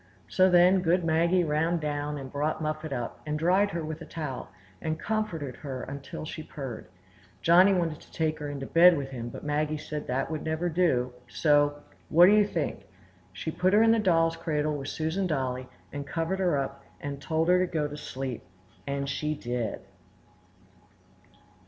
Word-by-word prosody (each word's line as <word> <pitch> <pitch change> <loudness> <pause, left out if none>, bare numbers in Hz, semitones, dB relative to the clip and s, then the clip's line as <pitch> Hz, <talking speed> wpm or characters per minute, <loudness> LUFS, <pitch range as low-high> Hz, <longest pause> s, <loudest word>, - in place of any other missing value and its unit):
So 185 0 +4
then 180 +1 +6
good 175 +1 +2
Maggie 170 +3 +3
ran 160 +2 +1
down 150 -1 -2
and 135 -2 -7
brought 150 +2 -1
Muffet 155 0 -3
up, 120 -3 -4
and 150 0 -2
dried 185 +6 +3
her 170 -4 -3
with 155 +1 -6
a - - -7
towel, 150 -6 -5 0.3
and 160 0 -2
comforted 190 - -2
her 130 -4 -6
till 140 - -7
she 155 - -6
purred. 135 -9 -7 0.6
Johnny 180 +4 +7
wanted 170 -5 0
to - - -19
take 155 -1 -1
her 150 -1 -4
into 140 -1 -5
bed 170 +3 +6
with 135 -1 -4
him, 120 -2 -5
but - - -9
Maggie 150 +1 0
said 150 0 -6
that 130 +5 -1
never 160 +2 -2
would 175 - -1
do; 130 -8 +2
so,—what 145 +4 +3
do 190 - +6
you 210 -1 +5
think? - - -3 0.4
She 160 - -4
put 185 +4 +1
her 215 +2 +6
in 225 - +5
the 225 - +4
doll's 165 -5 +3
cradle 150 -2 -1
with 135 -2 -5
Susan 160 +6 -1
Dolly, 130 -5 -2 0.3
and 140 -1 -5
covered 165 +4 -2
her 175 -6 +2
up, 140 0 -4 0.2
and 140 -1 -6
told 160 +3 0
her 180 0 +5
to 180 - -3
go 155 -3 0
to 145 - -7
sleep, 135 -4 -5 0.5
and 140 0 -2
she 150 +2 -2
did! 120 -5 -3
155 Hz, 185 wpm, -28 LUFS, 140-170 Hz, 0.6 s, Johnny